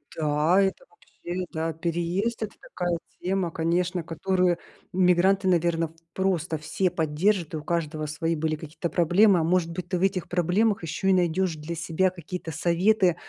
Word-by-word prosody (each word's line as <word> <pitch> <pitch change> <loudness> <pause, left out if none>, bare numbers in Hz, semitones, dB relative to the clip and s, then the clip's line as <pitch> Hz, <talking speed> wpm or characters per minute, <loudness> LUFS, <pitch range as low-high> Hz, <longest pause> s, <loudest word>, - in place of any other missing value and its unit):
Да, 155 +4 +2
это 195 - 0
вообще, 180 +1 -7
да, 160 0 -2
переезд. 175 +8 -1
Это 210 - -5
такая 175 -1 -3 0.2
тема, 185 -2 0
конечно, 170 +2 0
которую 180 +2 +1 0.4
мигранты, 185 +1 +3
наверно, 170 -2 +2
в, - - -21 0.2
просто 175 -4 0
все 180 +5 -1
поддержат, 165 +2 0
и - - -1
у 150 - -7
каждого 155 -2 -2
свои 165 +2 -1
были 155 0 -1
какие-то 160 +3 -5
проблемы. 180 +4 +4
А 160 - +1
может 170 0 +1
быть, 175 +1 -5
ты 185 - 0
в - - -5
этих 190 -2 0
проблемах 185 +4 +1
ещё 165 +4 -3
и 190 - +5
найдёшь 180 -1 +1
для 155 +3 -6
себя 170 +3 +1
какие-то 175 -1 -7
советы, 175 +3 +2
175 Hz, 165 wpm, -26 LUFS, 165-185 Hz, 0.4 s, и